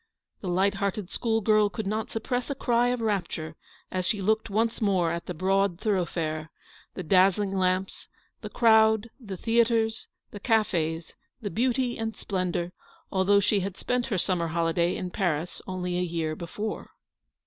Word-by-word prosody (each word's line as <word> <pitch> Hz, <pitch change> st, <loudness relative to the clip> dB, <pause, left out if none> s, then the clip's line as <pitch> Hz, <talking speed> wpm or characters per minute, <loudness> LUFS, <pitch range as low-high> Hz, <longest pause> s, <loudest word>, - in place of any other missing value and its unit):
The 190 Hz, -, -6 dB
light 190 Hz, +3 st, +2 dB
hearted 200 Hz, -1 st, -2 dB
school 225 Hz, -2 st, 0 dB
girl 215 Hz, 0 st, +4 dB
could 220 Hz, +1 st, -5 dB
not 215 Hz, +2 st, -2 dB
suppress 245 Hz, +3 st, -2 dB
a 280 Hz, -, -2 dB
cry 240 Hz, -2 st, +2 dB
of 245 Hz, -1 st, 0 dB
rapture 175 Hz, -7 st, -2 dB, 0.4 s
as 185 Hz, 0 st, -1 dB
she 205 Hz, +3 st, 0 dB
looked 220 Hz, +3 st, +1 dB
once 225 Hz, +3 st, 0 dB
more 185 Hz, -5 st, +2 dB
at 170 Hz, 0 st, -4 dB
the 180 Hz, -, -3 dB
broad 195 Hz, +1 st, +1 dB
thoroughfare, 165 Hz, -6 st, -1 dB, 0.5 s
the 185 Hz, -, -4 dB
dazzling 190 Hz, +3 st, +3 dB
lamps, 185 Hz, 0 st, 0 dB, 0.3 s
the -, -, -6 dB
crowd, 220 Hz, -1 st, +4 dB
the 200 Hz, -7 st, -7 dB
theatres, 225 Hz, 0 st, +1 dB, 0.2 s
the 205 Hz, -, -8 dB
cafes, 170 Hz, -8 st, 0 dB, 0.3 s
the 205 Hz, -, -3 dB
beauty 245 Hz, +1 st, 0 dB
and 225 Hz, 0 st, -3 dB
splendour, 180 Hz, -2 st, -2 dB, 0.4 s
although 195 Hz, +1 st, +4 dB
she 200 Hz, +1 st, +2 dB
had 190 Hz, 0 st, -4 dB
spent 250 Hz, 0 st, -1 dB
her 215 Hz, -7 st, -1 dB
summer 175 Hz, -2 st, 0 dB
holiday 170 Hz, +1 st, +1 dB
in 180 Hz, -1 st, -4 dB
Paris 175 Hz, -4 st, -1 dB
only 180 Hz, -1 st, -2 dB
a -, -, +1 dB
year 165 Hz, -3 st, -2 dB
before. 205 Hz, +6 st, -5 dB
195 Hz, 160 wpm, -27 LUFS, 180-220 Hz, 0.5 s, girl